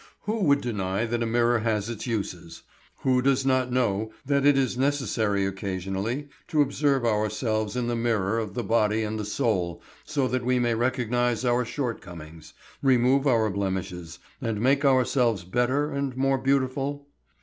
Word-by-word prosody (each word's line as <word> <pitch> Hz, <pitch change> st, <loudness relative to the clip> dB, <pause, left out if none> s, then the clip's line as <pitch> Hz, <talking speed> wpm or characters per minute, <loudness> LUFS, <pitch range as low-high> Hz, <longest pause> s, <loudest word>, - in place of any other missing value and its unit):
Who 215 Hz, +2 st, -2 dB
would 140 Hz, -1 st, +4 dB
deny 105 Hz, -2 st, -1 dB
that 120 Hz, +1 st, -2 dB
a 115 Hz, -, 0 dB
mirror 120 Hz, +1 st, +2 dB
has 110 Hz, -2 st, -1 dB
its 115 Hz, 0 st, -5 dB
uses? 90 Hz, -7 st, -4 dB, 0.4 s
Who 130 Hz, -1 st, +2 dB
does 135 Hz, 0 st, +2 dB
not 130 Hz, -1 st, +2 dB
know 110 Hz, -4 st, 0 dB
that 140 Hz, 0 st, +2 dB
it 145 Hz, -1 st, +5 dB
is 130 Hz, -2 st, +1 dB
necessary 115 Hz, -7 st, 0 dB
occasionally 95 Hz, +7 st, -3 dB, 0.2 s
to 150 Hz, -2 st, +3 dB
observe 140 Hz, -2 st, 0 dB
ourselves 110 Hz, 0 st, 0 dB
in 125 Hz, -1 st, -1 dB
the 120 Hz, 0 st, -1 dB
mirror 115 Hz, -2 st, 0 dB
of 105 Hz, -3 st, -5 dB
the 120 Hz, -, -2 dB
body 110 Hz, 0 st, +2 dB
and 110 Hz, 0 st, -3 dB
the 105 Hz, -, -3 dB
soul 105 Hz, -7 st, -1 dB, 0.2 s
so 140 Hz, -4 st, -1 dB
that 130 Hz, -1 st, -1 dB
we 125 Hz, +1 st, +2 dB
may 120 Hz, -1 st, +1 dB
recognize 120 Hz, 0 st, 0 dB
our 120 Hz, 0 st, +2 dB
shortcomings, 85 Hz, -, -6 dB, 0.3 s
remove 135 Hz, +1 st, +3 dB
our 115 Hz, -5 st, +3 dB
blemishes, 95 Hz, -3 st, -4 dB, 0.2 s
and 115 Hz, -4 st, -2 dB
make 135 Hz, +5 st, +2 dB
ourselves 125 Hz, -6 st, +2 dB
better 125 Hz, -, 0 dB
and 140 Hz, -2 st, -3 dB
more 135 Hz, 0 st, +2 dB
beautiful? 135 Hz, +2 st, -1 dB
120 Hz, 160 wpm, -26 LUFS, 105-130 Hz, 0.4 s, it